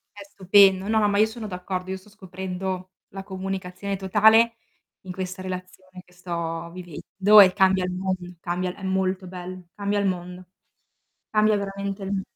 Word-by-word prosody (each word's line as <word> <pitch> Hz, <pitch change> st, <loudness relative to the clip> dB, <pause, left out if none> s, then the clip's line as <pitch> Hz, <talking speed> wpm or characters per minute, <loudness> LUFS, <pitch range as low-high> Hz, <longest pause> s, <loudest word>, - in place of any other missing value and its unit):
È 200 Hz, -, -9 dB
stupendo. 195 Hz, 0 st, +4 dB
No, 220 Hz, 0 st, +2 dB
no, 210 Hz, -1 st, +3 dB
ma 200 Hz, -, +1 dB
io 215 Hz, -, +6 dB
sono 220 Hz, 0 st, -7 dB
d'accordo, 185 Hz, 0 st, -5 dB
io 190 Hz, -, -3 dB
sto 190 Hz, +2 st, -18 dB
scoprendo 185 Hz, -1 st, -6 dB, 0.2 s
la 195 Hz, 0 st, -8 dB
comunicazione 190 Hz, 0 st, -5 dB
totale 220 Hz, +4 st, +4 dB, 0.5 s
in 185 Hz, -, -8 dB
questa 185 Hz, 0 st, -5 dB
relazione 185 Hz, 0 st, -8 dB
che 180 Hz, -, -24 dB
sto 170 Hz, -2 st, -5 dB
vivendo 185 Hz, +4 st, +3 dB
e 185 Hz, -1 st, +6 dB
cambia 190 Hz, -2 st, +3 dB
il 180 Hz, -, -3 dB
mondo, 185 Hz, -1 st, -4 dB
cambia 180 Hz, +1 st, -3 dB
è 195 Hz, -, -13 dB
molto 190 Hz, 0 st, -1 dB
bello, 180 Hz, 0 st, -8 dB
cambia 205 Hz, 0 st, -1 dB
il 200 Hz, -, 0 dB
mondo. 180 Hz, 0 st, -5 dB, 0.9 s
Cambia 215 Hz, 0 st, +3 dB
veramente 200 Hz, 0 st, -4 dB
il 195 Hz, -, -4 dB
m 195 Hz, -, -1 dB
190 Hz, 170 wpm, -24 LUFS, 180-200 Hz, 0.9 s, io